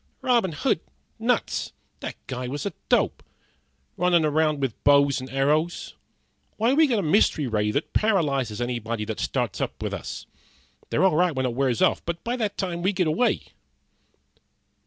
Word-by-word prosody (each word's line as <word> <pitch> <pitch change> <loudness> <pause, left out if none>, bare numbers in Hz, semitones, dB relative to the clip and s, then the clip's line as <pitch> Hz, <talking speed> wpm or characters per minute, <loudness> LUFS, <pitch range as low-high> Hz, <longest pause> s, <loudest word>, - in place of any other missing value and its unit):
"Robin 235 -9 +2
Hood 145 - +1 0.4
nuts! - - 0 0.3
That - - -5
guy 125 -1 -4
was 145 +7 -4
a 200 - -2 0.2
dope! - - +2 0.8
Runnin' 175 -2 +3
around 155 0 +2
with 135 -5 -3
bows 140 -2 +4
and 130 - -8
arrows. 150 +5 0 0.6
Why, 230 +4 +2
we 310 +2 +5
got 240 -5 +1
a 200 - 0
mystery 155 -3 +3
ray 105 -3 0
that 140 +8 -2
paralyzes 140 - +1
anybody 115 -3 -2
that 110 0 -5
starts - - -2
up - - -3
with - - -3
us. - - -6 0.6
They're 165 - +1
all 190 -5 +4
right 175 -1 +2
when 130 0 0
it 125 - -1
wears 125 -2 +1
off, - - +2
but 170 0 -4
by 240 +1 -1
that 210 -4 -2
time 175 -3 -2
we 190 +3 +1
get 185 -2 +1
away." 160 +11 +1
155 Hz, 170 wpm, -25 LUFS, 130-185 Hz, 0.8 s, we